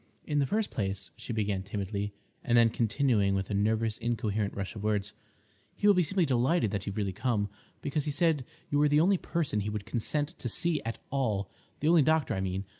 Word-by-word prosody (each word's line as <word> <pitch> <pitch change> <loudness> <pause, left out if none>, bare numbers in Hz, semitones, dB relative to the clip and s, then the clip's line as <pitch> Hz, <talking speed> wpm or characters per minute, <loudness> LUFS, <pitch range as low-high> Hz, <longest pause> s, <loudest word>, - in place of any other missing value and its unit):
"In 150 -1 0
the 140 - +2
first 215 +5 0
place," 95 -2 -3
she - - -7
began 105 -4 0
timidly, 100 +1 -3 0.3
and 120 -1 +3
then 115 -1 +6
continuing 110 -4 +2
with 95 +1 -2
a - - 0
nervous 110 +2 +1
incoherent 110 -3 -1
rush 100 +2 -4
of 105 - -6
words, 105 0 -1 0.6
"he - - -3
will 205 - +8
be 180 - +3
simply 175 +2 +1
delighted 130 - +2
that 100 -1 -3
you've 100 - -4
really 100 -3 -1
come, 105 -1 0 0.3
because 145 +1 -1
he - - -1
said 150 -1 +2 0.3
you 145 - +3
were 150 0 +4
the 145 +1 +4
only 185 +3 +4
person 160 -11 -1
he 105 +1 -2
would 105 -1 -4
consent 145 +5 -1
to 120 - -2
see 165 +7 +1
at 115 0 -4
all—the 125 +1 -2
only 165 -1 +6
doctor, 155 -1 +2
I 95 - -1
mean. 95 +1 -2
115 Hz, 210 wpm, -30 LUFS, 100-145 Hz, 0.6 s, will